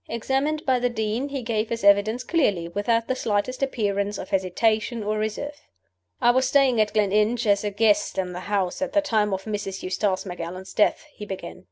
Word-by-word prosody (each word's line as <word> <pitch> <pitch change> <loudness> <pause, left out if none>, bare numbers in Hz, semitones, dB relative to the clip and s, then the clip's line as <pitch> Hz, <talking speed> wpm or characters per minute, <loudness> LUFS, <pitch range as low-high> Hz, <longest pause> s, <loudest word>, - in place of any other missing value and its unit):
Examined 270 +6 -1
by 260 -2 +3
the 245 0 +1
Dean, 225 +4 -2
he 275 -2 -4
gave 225 -1 -1
his 230 -2 -3
evidence 205 +4 +4
clearly, 205 - +1
without 230 +6 0
the - - +1
slightest 220 +2 -1
appearance 205 -6 -1
of - - -7
hesitation 215 +4 0
or 215 +1 -1
reserve. 285 +8 -4 0.6
"I 240 - +5
was 260 +1 +2
staying 265 -5 +4
at 210 - +1
Gleninch 215 +3 +2
as 200 -1 +3
a 210 - 0
guest 205 0 +2
in 180 -1 -2
the 175 - -5
house 195 +2 -1
at 280 0 -2
the 305 - +4
time 220 -8 +1
of 190 0 -2
Mrs. 205 -2 -4
Eustace 190 +1 -1
Macallan's 180 +1 -7
death," 210 - +2
he - - -9
began. 190 -1 -7
215 Hz, 195 wpm, -24 LUFS, 200-245 Hz, 0.6 s, I